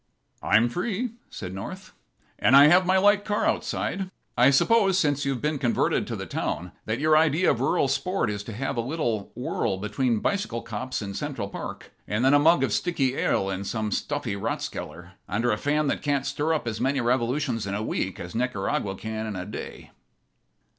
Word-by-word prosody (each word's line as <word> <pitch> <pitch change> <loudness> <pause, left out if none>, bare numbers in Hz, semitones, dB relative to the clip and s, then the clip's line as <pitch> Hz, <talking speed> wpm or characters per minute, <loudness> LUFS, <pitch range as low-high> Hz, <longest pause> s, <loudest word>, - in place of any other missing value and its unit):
"I'm 110 +3 +4
free," 210 - -2 0.2
said 90 -2 -7
North, 150 - -7 0.5
"and 130 - +5
I 145 +2 +9
have 180 +2 +5
my 190 0 +4
light 205 +1 +4
car 210 0 0
outside. 190 0 -1 0.3
I 125 +2 +6
suppose, 195 +6 +4
since 145 -5 +1
you've 135 -2 -2
been 150 -1 0
converted 120 -3 +1
to - - -3
the - - -5
town, 90 +1 -3
that 110 +1 -1
your 155 +1 +4
idea 160 +3 +4
of 120 - -2
rural 135 +1 +2
sport 180 - 0
is 105 -1 -4
to 115 - -6
have 135 +4 -3
a - - +2
little 120 -6 -2
whirl 115 -5 -1
between 110 +4 0
bicycle 125 - -1
cops 120 +1 -4
in 100 -1 -5
Central 125 -5 -4
Park - - -7 0.2
and 105 +5 0
then 135 - +5
a 145 - +6
mug 165 +4 +5
of - - 0
sticky 135 -7 0
ale 95 - +1
in 95 +1 -3
some 110 +1 -2
stuffy 145 -8 -2
rathskeller 90 -2 -5 0.2
under 115 +5 +1
a 105 - +1
fan 150 +4 +1
that 140 - -1
can't 140 -2 0
stir 145 +3 -1
up 155 -6 -1
as 110 -1 -3
many 135 +2 +1
revolutions 120 -2 0
in 100 - -2
a 105 - -2
week 95 -3 -2
as 85 0 -7
Nicaragua 105 -4 -1
can 110 +1 -4
in 105 - -4
a 90 0 -4
day." 105 - -8
130 Hz, 195 wpm, -26 LUFS, 110-150 Hz, 0.5 s, I